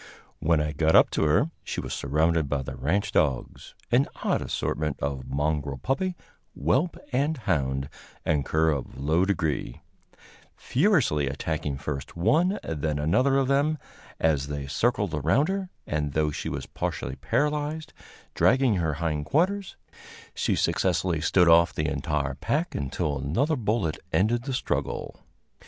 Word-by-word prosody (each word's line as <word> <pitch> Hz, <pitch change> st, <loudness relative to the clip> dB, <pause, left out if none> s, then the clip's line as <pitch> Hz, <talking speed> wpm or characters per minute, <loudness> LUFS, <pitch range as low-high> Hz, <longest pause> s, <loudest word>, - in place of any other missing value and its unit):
When 80 Hz, 0 st, +2 dB
I 75 Hz, 0 st, 0 dB
got 80 Hz, +1 st, +2 dB
up -, -, +6 dB
to -, -, +1 dB
her, 100 Hz, -, +3 dB
she -, -, -4 dB
was -, -, -4 dB
surrounded 80 Hz, +2 st, +1 dB
by 70 Hz, -2 st, -1 dB
the -, -, -6 dB
ranch 95 Hz, +9 st, 0 dB
dogs 70 Hz, -5 st, -1 dB, 0.2 s
an -, -, +4 dB, 0.2 s
odd -, -, +1 dB
assortment 75 Hz, -3 st, -2 dB
of 70 Hz, -2 st, -3 dB
"mongrel 70 Hz, -1 st, -1 dB
puppy, 175 Hz, -, -1 dB, 0.4 s
whelp 130 Hz, -, +1 dB, 0.2 s
and 145 Hz, +5 st, +1 dB
hound, 70 Hz, -, -1 dB, 0.4 s
and 75 Hz, -3 st, +2 dB
cur 80 Hz, +3 st, +2 dB
of 70 Hz, -4 st, -4 dB
low 80 Hz, +6 st, +2 dB
degree" 80 Hz, -10 st, -1 dB, 0.8 s
furiously 130 Hz, -, +2 dB
attacking 75 Hz, 0 st, -3 dB
first 70 Hz, +2 st, -5 dB
one, 160 Hz, -, +3 dB
then 75 Hz, -1 st, -2 dB
another 125 Hz, -, +2 dB
of 135 Hz, -1 st, +2 dB
them 145 Hz, +3 st, +2 dB, 0.4 s
as 75 Hz, -4 st, +1 dB
they 70 Hz, -1 st, -4 dB
circled 105 Hz, -, 0 dB
around 80 Hz, -, +2 dB
her; 195 Hz, -1 st, -2 dB, 0.2 s
and, 75 Hz, -2 st, -2 dB
though 75 Hz, -1 st, +1 dB
she -, -, -4 dB
was -, -, -4 dB
partially -, -, -4 dB
paralyzed, 150 Hz, +4 st, -1 dB, 0.4 s
dragging 130 Hz, -5 st, +3 dB
her 80 Hz, -3 st, 0 dB
hind 75 Hz, -2 st, -2 dB
quarters, 190 Hz, +5 st, 0 dB, 0.6 s
she -, -, 0 dB
successfully 85 Hz, -3 st, +1 dB
stood 90 Hz, +2 st, +4 dB
off 85 Hz, +1 st, +5 dB
the 75 Hz, -, 0 dB
entire 70 Hz, -1 st, -1 dB
pack 155 Hz, -, -1 dB
until 70 Hz, +1 st, -2 dB
another 120 Hz, -, +1 dB
bullet 105 Hz, -, -1 dB
ended 115 Hz, +5 st, +1 dB
the 135 Hz, -, -2 dB
struggle. -, -, -3 dB
80 Hz, 145 wpm, -26 LUFS, -, 0.8 s, up